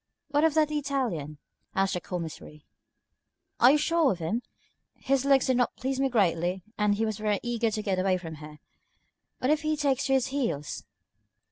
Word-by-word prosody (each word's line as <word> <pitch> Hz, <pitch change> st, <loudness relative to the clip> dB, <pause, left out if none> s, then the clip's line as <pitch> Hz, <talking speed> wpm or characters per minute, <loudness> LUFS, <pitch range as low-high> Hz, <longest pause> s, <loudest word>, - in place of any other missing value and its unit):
"What 290 Hz, +1 st, +2 dB
of 320 Hz, -1 st, +3 dB
that 305 Hz, -1 st, +3 dB
Italian?" 255 Hz, -, -2 dB, 0.4 s
asked 195 Hz, 0 st, +1 dB
the 180 Hz, -, -2 dB
Commissary. 160 Hz, -4 st, -7 dB, 0.9 s
"Are 245 Hz, -, +8 dB
you -, -, +4 dB
sure 325 Hz, 0 st, +2 dB
of 190 Hz, -, -2 dB
him? 175 Hz, +8 st, -2 dB, 0.5 s
His 275 Hz, 0 st, 0 dB
looks 275 Hz, -2 st, +4 dB
did 260 Hz, -1 st, +2 dB
not 245 Hz, -, +1 dB
please 265 Hz, +1 st, -3 dB
me 270 Hz, 0 st, +2 dB
greatly, 180 Hz, -5 st, +1 dB
and 210 Hz, -1 st, +2 dB
he 225 Hz, +2 st, 0 dB
was 220 Hz, -1 st, -3 dB
very 210 Hz, -1 st, 0 dB
eager 235 Hz, -1 st, 0 dB
to 215 Hz, 0 st, -3 dB
get 190 Hz, -3 st, 0 dB
away 185 Hz, 0 st, +2 dB
from 165 Hz, -3 st, -8 dB
here. 150 Hz, 0 st, -11 dB, 0.8 s
What 255 Hz, -, +1 dB
if 305 Hz, 0 st, +2 dB
he 310 Hz, 0 st, 0 dB
takes 275 Hz, -3 st, +1 dB
to 270 Hz, -, +2 dB
his 265 Hz, -2 st, +2 dB
heels?" 235 Hz, -, -3 dB
230 Hz, 190 wpm, -28 LUFS, 185-275 Hz, 0.9 s, Are